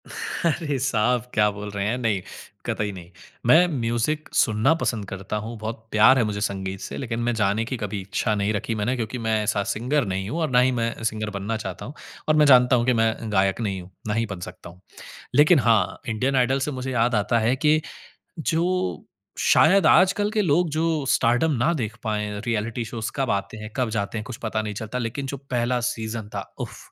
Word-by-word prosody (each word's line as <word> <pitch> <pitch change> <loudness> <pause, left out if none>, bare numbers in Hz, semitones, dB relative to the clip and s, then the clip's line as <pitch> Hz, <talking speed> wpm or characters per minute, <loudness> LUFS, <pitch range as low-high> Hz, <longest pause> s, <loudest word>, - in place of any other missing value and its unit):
अरे 155 -3 -2
साहब, 125 -2 +1
क्या 105 0 +4
बोल 105 0 -7
रहे 100 -1 -2
हैं? 120 +4 0
नहीं, 110 -6 0 0.4
कतई 105 -1 -1
नहीं। 90 -3 -10 0.4
मैं 160 +9 +6
म्यूज़िक 120 +7 -1
सुनना 110 +6 +3
पसंद 115 -10 -2
करता 95 +2 -5
हूँ, 115 +1 -6
बहुत 110 +1 -6
प्यार 120 +5 +6
है 125 - +3
मुझे 105 -1 -3
संगीत 95 -2 -3
से - - -6
लेकिन 115 -3 -3
मैं 120 0 +1
जाने 105 +1 +1
की 130 +2 -4
कभी 105 -2 -4
इच्छा 100 +3 -1
नहीं 100 +1 0
रखी 110 +2 -2
मैंने 110 +4 0
क्योंकि 120 0 -3
मैं 110 - +2
ऐसा 105 -1 0
सिंगर 130 +5 0
नहीं 95 0 -3
हूँ 165 - -3
और 155 - 0
ना 125 - +5
ही 130 +1 +4
मैं 115 0 -3
सिंगर 110 -1 -1
बनना 110 +3 -2
चाहता 110 - -6
हूँ 140 - -8 0.4
और 155 - +5
मैं 150 -1 +5
जानता 125 -2 +6
हूँ 120 -1 +1
कि 125 - +3
मैं 115 -1 +2 0.2
गायक 95 +2 +2
नहीं 100 -4 -2
हूँ, 90 +1 -14 0.2
ना 105 - 0
ही 115 +1 +1
बन 95 -4 -7
सकता 85 - -9
हूँ। 90 +2 -17 0.5
लेकिन 150 +3 +6
हाँ, 115 -6 +2
इंडियन 130 +5 0
आइडल 130 +1 +2
से 140 +2 -2
मुझे 130 -1 -4
याद 120 -1 +2
आता 105 +3 +2
है 115 +3 +2
कि 155 +3 +3 0.6
जो 165 - -1 0.3
शायद 190 +2 +5
आजकल 195 +3 +4
के 215 -1 +1
लोग 175 -1 +2
जो 155 -1 0
स्टारडम 125 +8 +3
ना 125 +8 +2
देख 110 -8 -3
पाएँ, 105 -1 -2
रिऐलिटी 115 +1 -1
शोज़ 110 0 -4
कब 135 -3 -1
आते 100 +2 -2
हैं, 110 0 -7
कब 125 -3 +1
जाते 110 0 -2
हैं, 105 - -3
कुछ 125 -1 -7
पता 110 -1 -1
नहीं 105 -1 -4
चलता। 110 +3 -5
लेकिन 125 +4 -3
जो 140 - -4
पहला 125 0 +1
सीज़न 110 -2 -4
था - - -2 0.2
उफ़, - - -6
115 Hz, 215 wpm, -24 LUFS, 105-130 Hz, 0.6 s, मैं